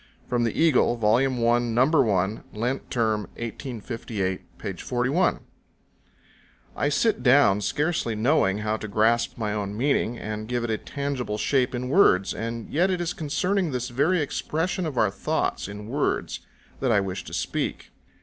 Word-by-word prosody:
[From 120 -1 +1
the 115 - -2
Eagle, 155 -7 +4
Vol. 115 +4 +3
1, 120 -1 +1
No. 125 +2 +5
1, 110 - +1
Lent 125 +5 -2
Term, 110 -3 +1 0.2
1858, 115 -5 -5
p. - - -4
41.] 130 +9 0 1.3
I 145 - +1
sit 215 +8 +1
down 125 -6 +5
scarcely 145 - 0
knowing 110 -4 +2
how 110 0 0
to 110 - -6
grasp 110 +3 +2
my 105 -3 -2
own 105 -1 -3
meaning, 120 -2 +1
and 110 0 -5
give 120 0 -1
it 120 - -1
a 110 - -1
tangible 140 -6 -3
shape 125 +2 +1
in 125 +1 -3
words; 125 - +4
and 115 0 -5
yet 175 +6 +2
it 185 -2 0
is 175 0 -2
concerning 175 +5 0
this 125 -2 -3
very 150 +8 +2
expression 165 +5 -2
of 140 -5 -5
our 105 -4 +3
thoughts 100 - -1
in 105 +1 -8
words 140 +5 -1 0.4
that 130 -3 +1
I 105 - +4
wish 95 -2 -3
to - - -10
speak. - - -3
120 Hz, 160 wpm, -25 LUFS, 110-145 Hz, 1.3 s, No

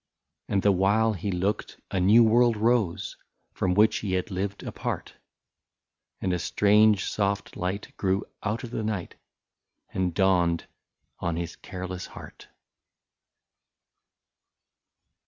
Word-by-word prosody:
62 - - -5
And 100 - +3
the 100 - +5
while 100 +4 +3
he 100 +1 -3
looked 95 +4 -2
a 95 - 0
new 105 +6 +6
world 115 0 +4
rose, 110 -5 +1 0.4
From 90 -1 0
which 105 +2 +4
he 100 -3 -3
had 95 +4 -1
lived 100 +2 -3
apart, - - -4 1.1
And 95 - -1
a 90 - 0
strange 105 +3 +4
soft 100 -1 -1
light 95 +3 -4
grew 95 +1 0 0.2
out 110 +4 -2
of 120 - -7
the 115 - -2
night, 105 -4 -3 0.8
And 90 -1 0
dawned 85 -2 +2 0.5
on 85 -1 -1
his 85 0 -4
careless 95 0 -6
heart. - - -12
100 Hz, 125 wpm, -27 LUFS, 90-105 Hz, 1.1 s, new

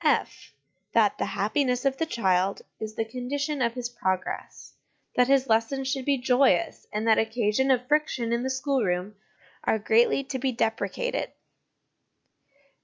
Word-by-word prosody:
(/) - - -41
That - - +3
the - - 0
happiness 250 -3 0
of 270 0 +1
the 325 - -1
child 190 - +1 0.2
is 215 0 -6
the 225 - -1
condition 275 +5 -3
of 235 -1 +1
his 250 -1 -3
progress; 190 -6 -4 0.4
that 250 0 +4
his 270 -1 +4
lessons 260 +3 +1
should 265 -2 -2
be 280 -1 +2
joyous, 260 +6 +2
and 215 +2 -2
that 220 - +5
occasions 225 +3 +1
of 250 -1 +1
friction 260 -6 +1
in 235 - 0
the 260 - -2
schoolroom 235 -9 -1 0.5
are - - +2
greatly 225 +5 +3
to 265 -1 -5
be 265 +1 0
deprecated. 245 - -2
250 Hz, 150 wpm, -26 LUFS, 225-270 Hz, 0.5 s, that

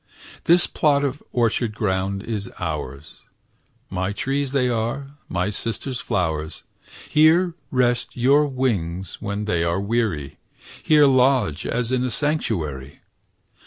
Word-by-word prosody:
This 175 +1 +5
plot 145 -3 +2
of 140 +1 -2
orchard 115 -2 0
ground 100 -2 -1
is 105 -4 -4
ours; 75 -3 -5 0.7
My 95 +2 -1
trees 135 +5 -1
they 135 -2 +2
are, 120 +4 -2 0.2
my 90 +3 -1
Sister's 120 +5 -2
flowers; 80 -7 -2 0.4
Here 165 +3 +4 0.2
rest 120 -2 0
your 140 +5 +4
wings 95 -10 -2
when 105 0 -3
they 85 -5 +1
are 85 +2 0
weary; 100 - -1 0.4
Here 150 -2 +5
lodge 130 - +3
as 120 0 -1
in 130 -1 +1
a 130 - 0
sanctuary! 85 - -2
115 Hz, 125 wpm, -23 LUFS, 90-135 Hz, 0.7 s, This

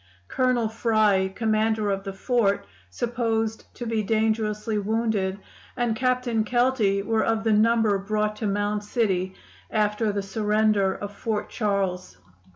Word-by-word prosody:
Colonel 255 -3 +1
Fry, 215 -4 +2
commander 215 +1 0
of 195 0 -2
the 195 - -4
fort, 200 -1 +1 0.2
supposed 225 - -2
to 240 - -6
be 225 -1 0
dangerously 215 0 0
wounded, 210 -2 0 0.4
and 240 -2 0
Captain 250 -2 +1
Kelty 235 -4 +1
were 220 +1 +1
of 225 -1 0
the 225 -1 +2
number 220 -1 +3
brought 210 +1 -1
to 215 - -2
Mound 205 +1 -1
City 190 -4 -1 0.3
after 210 0 +1
the 200 -1 -2
surrender 210 -1 +1
of 205 0 -7
Fort 215 -2 -3
Charles. 195 - -2
215 Hz, 135 wpm, -25 LUFS, 200-225 Hz, 0.4 s, number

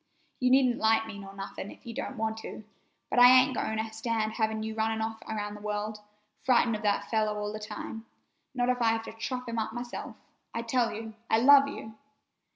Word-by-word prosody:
You 250 - +3
needn't 255 -2 +4
like 225 0 +3
me 220 -2 -8
nor 195 -1 -9
anything 195 0 -7
if - - -14
you 235 - -6
don't 270 +1 -5
want 220 0 -1
to, 220 - -8 0.5
but - - +3
I 245 - +10
ain't 255 +1 +6
going 220 -2 -2
to 220 0 -3
stand 220 -1 -1
having 220 -1 -1
you 220 0 -3
off - - -12
running 220 0 0 0.3
around 210 -1 -3
the 210 - -10
world, 210 +1 -3 0.4
frightened 240 -3 +3
of 210 - -5
that 205 -2 0
fellow 215 -2 +1
all 210 0 -3
the 215 - -5
time, 225 +1 -7 0.5
not 245 -1 +1
if 250 -1 +1
I 225 -1 +4
have 225 0 -2
to - - -8
chop 250 +3 -4
him 230 -1 -2
up 220 0 -2
myself. 240 0 -6 0.4
I 230 - -2
tell 235 0 +1
you, 220 +1 -6 0.2
I - - +4
love 275 +3 +7
you!" 220 -5 -8
225 Hz, 220 wpm, -29 LUFS, 215-240 Hz, 0.5 s, I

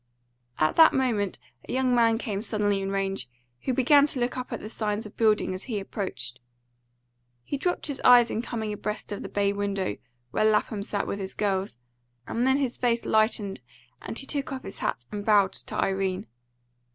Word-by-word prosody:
At 155 - +1
that 325 -1 +8
moment 230 -7 0 0.3
a - - -3
young 255 -1 +2
man 230 -2 +4
came 205 -3 -3
suddenly 205 -3 0
in 195 - -2
range, 195 -8 -2 0.4
who - - +1
began 280 +3 +5
to 275 - -1
look 240 +1 0
up 255 0 -5
at - - -3
the - - -7
signs 215 0 -2
of 210 - -11
building 215 -4 +2
as 185 - -7
he 225 -5 -2
approached. 185 - -4 1.0
He 285 - -3
dropped 355 +6 -1
his 285 -3 -3
eyes 245 -1 +7
in 220 - -1
coming 220 -3 -3
abreast 210 +1 -4
of 205 - -4
the - - -6
bay 200 0 +1
window, 200 - -2 0.3
where 215 - +1
Lapham 215 -1 +2
sat 200 0 -2
with 200 - -3
his 190 -1 -4
girls, 195 - -1 0.5
and 240 +3 0
then 265 +1 +4
his 265 -4 -1
face 235 -1 +1
lightened, 215 - +1 0.4
and 225 - -6
he 270 - -3
took 280 +1 -2
off 265 -1 -5
his - - -8
hat 120 - -2
and 205 -1 -4
bowed 205 -3 +4
to - - -4
Irene. 190 -1 0
215 Hz, 195 wpm, -27 LUFS, 200-245 Hz, 1.0 s, that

